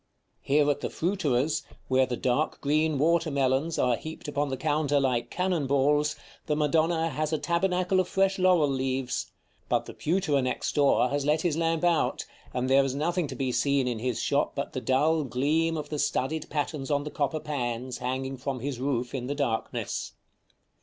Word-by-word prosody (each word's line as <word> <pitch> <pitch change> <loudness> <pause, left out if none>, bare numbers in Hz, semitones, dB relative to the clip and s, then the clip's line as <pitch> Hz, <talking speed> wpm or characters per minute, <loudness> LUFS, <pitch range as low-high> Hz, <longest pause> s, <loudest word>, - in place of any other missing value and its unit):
Here 145 +1 +3
at 145 - -3
the - - -2
fruiterer's, 155 -5 0 0.3
where 130 0 +3
the 125 - -3
dark 130 +7 0
green 155 +1 +1
water 165 +3 +2
melons 140 +3 +1
are 125 -1 +3
heaped 160 0 -8
upon 145 0 -1
the 130 - -3
counter 145 -1 +1
like 125 -3 0
cannon 180 -5 0
balls, 145 +2 +2 0.3
the 150 - +1
Madonna 160 +2 +1
has 155 +1 -2
a 155 - +1
tabernacle 180 +4 +1
of 185 - +1
fresh 195 +1 +1
laurel 180 -5 +4
leaves; 130 -2 -2 0.4
but - - +1
the - - -9
pewterer 155 -4 +1
next 130 0 -2
door 140 -3 +3
has 145 +1 -1
let 150 +2 +2
his 170 -4 +1
lamp 165 0 0
out, 175 -2 +1 0.3
and 125 +1 -1
there 135 +1 +5
is 135 -1 -2
nothing 170 +3 0
to 135 - -7
be 130 0 -1
seen 135 +2 +1
in 120 -3 -2
his 125 0 -2
shop - - 0
but - - -4
the - - -3
dull 155 +4 +2
gleam 155 +5 +1
of 150 -1 -5
the 150 - -3
studded 145 +2 -1
patterns 145 -2 -3
on 145 -1 +1
the 150 - -6
copper 145 +2 -1
pans, 125 -4 -3
hanging 130 +1 -3
from 130 0 -3
his 130 0 -4
roof 125 -2 -1
in 125 -2 -3
the 145 - -2
darkness. 125 -6 -2
145 Hz, 190 wpm, -27 LUFS, 130-160 Hz, 0.4 s, there